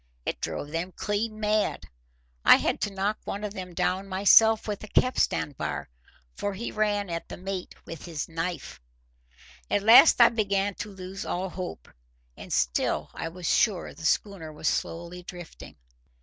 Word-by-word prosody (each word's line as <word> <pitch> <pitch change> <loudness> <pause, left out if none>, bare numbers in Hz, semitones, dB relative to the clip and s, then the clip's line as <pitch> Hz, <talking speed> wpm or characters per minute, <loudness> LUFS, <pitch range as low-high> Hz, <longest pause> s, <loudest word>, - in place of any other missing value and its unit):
It - - -3
drove 145 - -4
them 170 +3 -3
clean 215 +1 -2
mad. 215 0 0 0.6
I - - +9
had - - -1
to - - 0
knock 195 +2 -1
one 205 - -5
of 205 -1 -4
them 185 -3 -7
down 190 +3 0
myself 210 +4 +5
with 210 -1 -4
a - - -7
capstan 255 - +1
bar, 140 - -4 0.4
for 205 -1 -3
he 235 +5 -5
ran 205 -1 0
at 170 0 -5
the - - -7
mate 185 0 -5
with 165 - -8
his 165 -4 -4
knife. 165 - -5 0.9
At 205 - +1
last 230 +9 +8
I 235 - +9
began 200 -3 0
to 210 - -4
lose 190 0 -7
all 185 +2 -3
hope. 180 - -7 0.5
And - - -11
still 60 -2 0
I 165 - -4
was 175 +1 -9
sure 200 -6 +2
the - - -13
schooner 175 -2 0
was 150 0 -4
slowly 170 +2 -2
drifting. 175 -1 -11
195 Hz, 165 wpm, -27 LUFS, 175-210 Hz, 0.9 s, I